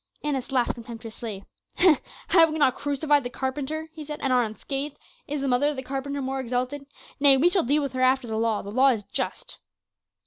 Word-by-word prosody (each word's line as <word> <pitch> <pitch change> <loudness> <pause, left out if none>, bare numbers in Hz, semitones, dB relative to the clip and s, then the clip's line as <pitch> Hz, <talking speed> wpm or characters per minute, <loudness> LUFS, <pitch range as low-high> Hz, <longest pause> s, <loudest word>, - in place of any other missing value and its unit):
Annas 275 -3 -2
laughed 250 -3 +2
contemptuously. 225 -3 -8 0.8
"Have 330 -3 +6
we 310 - -3
not 280 -4 +4
crucified 290 0 +1
the 245 - -3
carpenter?" 290 +5 -3
he 315 -2 -8
said, 300 0 -6
"and 265 -2 +2
are 250 - +5
unscathed; 275 +6 -4 0.3
is 290 -1 -3
the 275 - -1
mother 255 +3 +3
of 295 - -1
the 260 - -5
carpenter 275 +1 -4
more 265 +1 -2
exalted? 255 +3 -3 0.3
Nay, 280 -1 +7
we 325 +7 +4
shall 370 - +4
deal 290 +4 +2
with 275 -2 -3
her 255 - -2
after 255 -1 +3
the 220 - -3
law; 220 -1 0
the 200 - -7
law 260 +5 +4
is 230 -6 +2
just." - - -4
270 Hz, 205 wpm, -25 LUFS, 245-290 Hz, 0.8 s, Nay